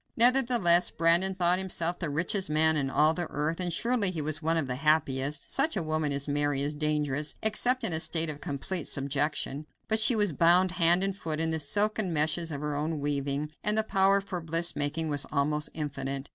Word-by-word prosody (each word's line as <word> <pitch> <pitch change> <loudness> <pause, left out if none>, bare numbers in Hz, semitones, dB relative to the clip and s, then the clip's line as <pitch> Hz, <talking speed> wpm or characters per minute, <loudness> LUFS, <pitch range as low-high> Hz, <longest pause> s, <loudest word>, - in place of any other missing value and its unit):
Nevertheless, 235 -8 +5
Brandon 170 +3 +1
thought 180 0 +1
himself 175 -2 -3
the 170 - -3
richest 170 +6 0
man 160 +1 +3
in 140 -3 -1
all 155 +3 +2
the 175 0 -3
earth, 155 +4 -3
and 180 -1 -1
surely 225 +3 +2
he 175 -3 -4
was 155 +1 -3
one 165 +1 0
of 160 - 0
the 125 -1 -5
happiest. 140 -1 0
Such 275 -2 +1
a 180 - -1
woman 155 -1 -2
as 140 0 -1
Mary 145 -1 -1
is 145 +1 -1
dangerous, 150 -1 -1
except 245 +4 +2
in 185 - +1
a 160 - +3
state 165 0 -1
of 150 -1 -7
complete 150 +4 -5
subjection 145 +1 -2 0.2
but 220 0 +1
she 225 +2 +3
was 205 -6 +1
bound 175 +4 +3
hand 175 +1 +3
and 195 -1 -2
foot 160 -5 -5
in 160 0 -1
the 160 - -1
silken 205 +6 0
meshes 160 +2 0
of 145 -1 -5
her 150 -1 -3
own 155 +1 -3
weaving, 145 +1 -3
and 210 +1 0
her 220 - +3
power 195 -1 +2
for 190 -3 -6
bliss 165 +1 0
making 150 +3 -2
was 145 -1 +3
almost 150 +1 -1
infinite. 135 -2 -5
160 Hz, 210 wpm, -28 LUFS, 145-185 Hz, 0.2 s, Nevertheless